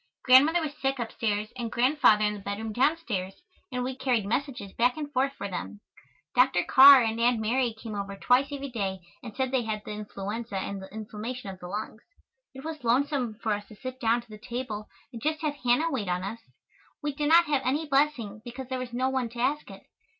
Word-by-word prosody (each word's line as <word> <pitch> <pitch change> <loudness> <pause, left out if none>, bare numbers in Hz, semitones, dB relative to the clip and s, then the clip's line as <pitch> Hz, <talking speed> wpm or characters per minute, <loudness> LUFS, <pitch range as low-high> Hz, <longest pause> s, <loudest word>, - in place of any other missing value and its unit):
Grandmother 285 +7 +6
was 305 -2 -3
sick 270 0 0
upstairs 220 -2 -2
and 235 -3 -4
Grandfather 245 -4 +4
in 210 - +1
the 210 - -7
bedroom 205 +2 -4
downstairs, 245 - -1 0.3
and 250 0 -2
we 260 +1 -3
carried 250 -6 0
messages 240 -2 -3
back 245 +3 +2
and 295 -1 -5
forth 270 +1 +2
for 200 - -5
them. 100 - -6 0.5
Dr. 250 -8 +4
Carr 270 -1 +9
and 225 0 -1
Aunt 240 -1 +3
Mary 235 +1 0
came 220 -1 -7
over 200 -1 -4
twice 250 +6 +3
every 280 -1 -5
day 195 -5 -3 0.2
and 230 -4 -9
said 260 -1 -1
they 260 -2 +2
had 215 -2 -4
the - - -6
influenza 210 +1 -5
and 195 +1 -4
the 190 - -11
inflammation 215 +1 -6
of 190 - -11
the 180 - -8
lungs. 215 +3 -5 0.5
It 265 - -9
was 315 -4 -6
lonesome 250 -1 +1
for 220 -2 +1
us 205 0 -5
to 215 - -13
sit 255 +3 -7
down 235 -1 +2
to - - -25
the 215 -1 -10
table 235 -2 -5 0.3
and 230 - -7
just 310 +2 -1
have 295 -2 -2
Hannah 255 +7 +2
wait 230 -8 -2
on 180 +1 -1
us. 215 +4 -5 0.6
We 295 -1 -1
did 295 +1 -1
not 340 +1 +7
have 290 -4 +1
any 285 +6 0
blessing 270 -7 +1
because 245 +1 -8
there 260 -1 -2
was 250 -1 -6
no 255 +2 +1
one 260 -3 -1
to 235 +1 -10
ask 290 +5 0
it. - - -11
240 Hz, 215 wpm, -28 LUFS, 210-270 Hz, 0.6 s, Carr